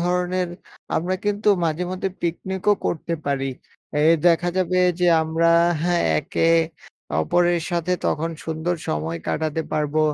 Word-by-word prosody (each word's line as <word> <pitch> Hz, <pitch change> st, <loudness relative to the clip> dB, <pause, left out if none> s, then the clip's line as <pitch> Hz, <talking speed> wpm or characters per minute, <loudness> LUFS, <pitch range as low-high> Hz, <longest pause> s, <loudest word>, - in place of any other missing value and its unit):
ধরনের, 180 Hz, +1 st, 0 dB, 0.5 s
আমরা 180 Hz, +3 st, 0 dB
কিন্তু 205 Hz, +1 st, 0 dB, 0.2 s
মাঝে 165 Hz, +2 st, -1 dB
মধ্যে 185 Hz, +1 st, -2 dB
পিকনিকও 190 Hz, +4 st, 0 dB
করতে 170 Hz, +1 st, -2 dB
পারি। 135 Hz, -1 st, 0 dB, 0.6 s
এই 160 Hz, +2 st, +6 dB
দেখা 175 Hz, +1 st, +4 dB
যাবে 185 Hz, 0 st, +1 dB, 0.2 s
যে 180 Hz, -, +3 dB, 0.2 s
আমরা 165 Hz, +1 st, +1 dB, 0.3 s
হ্যাঁ? 175 Hz, 0 st, +2 dB, 0.2 s
একে 165 Hz, -, 0 dB, 0.7 s
অপরের 175 Hz, -, +2 dB
সাথে 175 Hz, +1 st, 0 dB
তখন 165 Hz, +2 st, 0 dB
সুন্দর 160 Hz, +2 st, -2 dB
সময় 80 Hz, +2 st, -2 dB
কাটাতে 160 Hz, +1 st, -1 dB
পারবো 150 Hz, 0 st, 0 dB
170 Hz, 130 wpm, -22 LUFS, 160-180 Hz, 0.7 s, এই